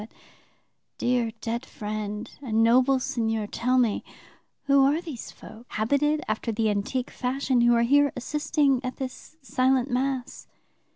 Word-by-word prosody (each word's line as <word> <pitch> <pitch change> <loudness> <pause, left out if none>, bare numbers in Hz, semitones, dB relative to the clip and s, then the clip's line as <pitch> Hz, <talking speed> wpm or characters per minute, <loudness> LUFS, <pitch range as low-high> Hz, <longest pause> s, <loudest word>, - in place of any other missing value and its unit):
But, 215 - -11 0.9
dear 245 -2 +1
dead 235 +1 -3
friend 210 -1 -5
and 225 -4 +1
noble 255 +3 +4
seigneur, 225 -3 -1
tell 250 +4 0
me, 235 -4 +2 0.6
who 275 -1 +4
are 285 +4 +3
these 315 -9 -8
folk, 230 +3 -13
habited 285 +7 +1
after 215 +2 -2
the 220 0 +1
antique 210 +5 -2
fashion, 260 0 0
who 240 0 +5
are 235 - +3
here 285 +3 +4
assisting 280 0 0
at 255 0 -4
this 265 +3 -7
silent 260 -1 +1
Mass?' 260 0 -2
250 Hz, 140 wpm, -26 LUFS, 225-270 Hz, 0.9 s, who